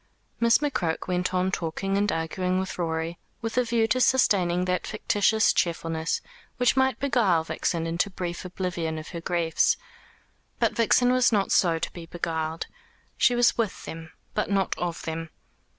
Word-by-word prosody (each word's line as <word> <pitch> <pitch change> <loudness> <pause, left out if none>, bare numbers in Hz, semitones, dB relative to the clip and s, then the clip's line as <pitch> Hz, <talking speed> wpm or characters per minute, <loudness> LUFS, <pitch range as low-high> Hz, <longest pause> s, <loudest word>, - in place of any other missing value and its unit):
Miss 235 0 +5
McCroke 260 - -2
went 180 0 0
on 185 0 +1
talking 185 +3 -2
and 205 0 +2
arguing 180 +3 -1
with 190 -1 -4
Rorie, 165 0 -2 0.2
with 225 -1 -4
a 250 - +3
view 230 -1 +1
to 255 +2 +2
sustaining 185 -9 +3
that 180 0 -1
fictitious 215 +1 +2
cheerfulness 165 -2 -1 0.4
which 245 -2 +3
might 265 -2 +2
beguile 235 - +2
Vixen 165 0 -2
into 170 +4 0
brief 175 -2 -5
oblivion 175 -3 -3
of 155 - -7
her 170 -2 -6
griefs. 170 -1 +1 0.8
But - - +2
Vixen 245 +2 +4
was 255 -1 +4
not 200 -3 +1
so 170 -3 +3
to - - -4
be 170 -2 -9
beguiled. 160 -1 -3 0.5
She 245 -2 +3
was 240 0 +3
with 220 -4 -2
them, 160 0 -8 0.2
but 210 - -1
not 195 -2 +1
of 175 -1 -3
them. 165 0 -4
180 Hz, 165 wpm, -26 LUFS, 165-220 Hz, 0.8 s, Miss